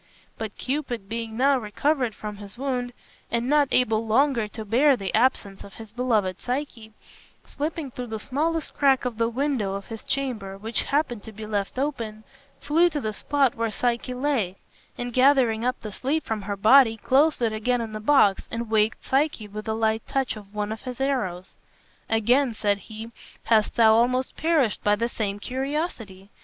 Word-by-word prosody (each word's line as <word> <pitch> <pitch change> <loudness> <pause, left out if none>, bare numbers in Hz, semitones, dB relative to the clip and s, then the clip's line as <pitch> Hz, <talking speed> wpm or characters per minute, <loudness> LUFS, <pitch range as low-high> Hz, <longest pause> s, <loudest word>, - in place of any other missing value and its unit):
But 220 -2 -6
Cupid, 255 -7 -3
being 225 0 -5
now 270 +1 +4
recovered 245 +2 0
from 210 -1 -7
his 205 +1 -10
wound, 250 -2 -2 0.4
and 235 +1 -1
not 290 0 +4
able 225 -2 +2
longer 240 -1 +2
to 220 +1 -8
bear 265 +7 +4
the 195 -3 -4
absence 220 -5 +1
of 200 - -13
his 220 -2 -10
beloved 215 -6 0
Psyche, 245 -4 -4 0.5
slipping 300 -1 -4
through 245 0 -6
the 220 -1 -5
smallest 310 +7 -1
crack 270 -3 +3
of 235 -3 -3
the 230 0 +2
window 240 -6 -1
of 200 +3 -7
his 225 -1 -7
chamber 225 -8 -3
which 220 +3 -2
happened 275 -6 -1
to 220 - -10
be 215 +1 -8
left 205 +1 -3
open, 230 -6 -3 0.4
flew 325 +5 +3
to 300 -3 -3
the 215 -5 -3
spot 275 +3 +1
where 230 0 -1
Psyche 240 +2 -1
lay, 250 -9 -1 0.4
and 245 0 -4
gathering 255 -4 +4
up 250 +1 0
the 215 - -6
sleep 280 +10 -1
from 220 -2 -2
her 200 0 -4
body 225 +2 +6
closed 280 +7 +3
it 230 -3 +1
again 245 +3 0
in 225 -2 -4
the 215 - -4
box, 215 -5 +3
and 230 -1 -4
waked 215 0 +1
Psyche 270 -5 0
with 215 +2 -8
a 220 - 0
light 220 0 +1
touch 270 -3 -1
of 205 -1 -13
one 210 0 -2
of 220 - -5
his 255 -1 -7
arrows. 215 -10 -1 0.6
"Again," 235 +3 +2
said 205 -1 +1
he, 220 +2 -9 0.3
"hast 220 -2 +2
thou 220 -2 +6
almost 250 +3 +2
perished 315 -8 +1
by 205 0 +4
the 230 +3 -1
same 205 -4 -3
curiosity. 250 - -4
230 Hz, 185 wpm, -25 LUFS, 215-270 Hz, 0.6 s, body